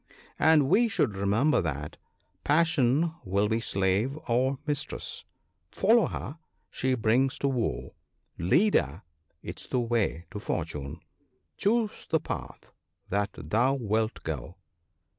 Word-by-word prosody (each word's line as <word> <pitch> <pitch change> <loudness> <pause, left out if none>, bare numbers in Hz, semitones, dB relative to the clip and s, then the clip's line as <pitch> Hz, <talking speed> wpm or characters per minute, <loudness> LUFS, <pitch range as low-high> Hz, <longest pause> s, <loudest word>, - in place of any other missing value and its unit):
And 155 -3 +5
we 235 - +4
should 140 - 0
remember 105 +10 +2
that 75 -3 -4 0.5
"Passion 160 -1 +3
will 100 +1 +1
be 110 +1 +1
Slave 100 +5 0
or 130 +3 +2
Mistress: 145 -2 -3 0.4
follow 225 - +4
her, 150 +5 -6 0.3
she 130 0 0
brings 125 +3 +2
to 140 - 0
woe; 125 -4 -2 0.5
Lead 175 - +3
her, 75 +6 +1 0.4
'tis - - -7
the 125 - 0
way 115 -8 0
to 105 - -5
Fortune. 80 -5 -4 0.5
Choose 220 +1 0
the 160 - +3
path - - -7 0.4
that 100 +1 0
thou 115 - +1
wilt 110 -2 -1
go." 80 +3 -5
120 Hz, 125 wpm, -28 LUFS, 95-145 Hz, 0.5 s, And